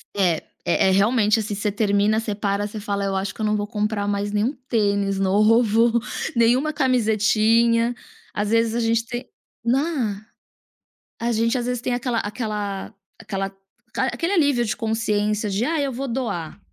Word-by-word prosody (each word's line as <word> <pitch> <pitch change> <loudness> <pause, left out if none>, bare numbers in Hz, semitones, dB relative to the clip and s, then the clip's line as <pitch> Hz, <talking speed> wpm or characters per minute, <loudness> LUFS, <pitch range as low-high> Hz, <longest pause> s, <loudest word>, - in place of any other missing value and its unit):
É, 180 -5 +2 0.3
é - - +3
é - - +4
realmente, 215 +2 +3
assim, 215 -1 -3
você 205 +1 -1
termina, 205 +1 +2
você 220 -2 -3
para, 200 0 -1
você 210 +1 -7
fala: 200 -1 -2
"Eu 195 0 -1
acho 190 +1 -2
que - - -8
eu - - +1
não 210 0 +1
vou 205 0 -3
comprar 210 -1 -2
mais 205 0 -1
nenhum 210 +6 0 0.2
tênis 200 -3 +1
novo, 225 +4 +3 0.4
nenhuma 245 +6 +3
camisetinha." 230 -2 +3 0.4
Às 205 0 -1
vezes 230 0 +2
a 240 - 0
gente 230 0 +1
tem 240 +2 -5 0.4
né. 245 -5 0 1.0
A 235 +1 0
gente 230 +2 +1
às 240 - -3
vezes 250 -1 -2
tem 250 - -1
aquela 245 -1 -1
aquela 205 -2 -4 0.3
aquela 195 -3 -3 0.5
a - - +3
aquele 340 +3 -1
alívio 285 -9 +3
de 215 - -2
consciência 215 -2 0
de: 200 +4 0
"Ah, 320 +3 0
eu 280 -2 -1
vou 265 +3 -4
doar". 215 -9 -3
220 Hz, 170 wpm, -22 LUFS, 205-235 Hz, 1.0 s, é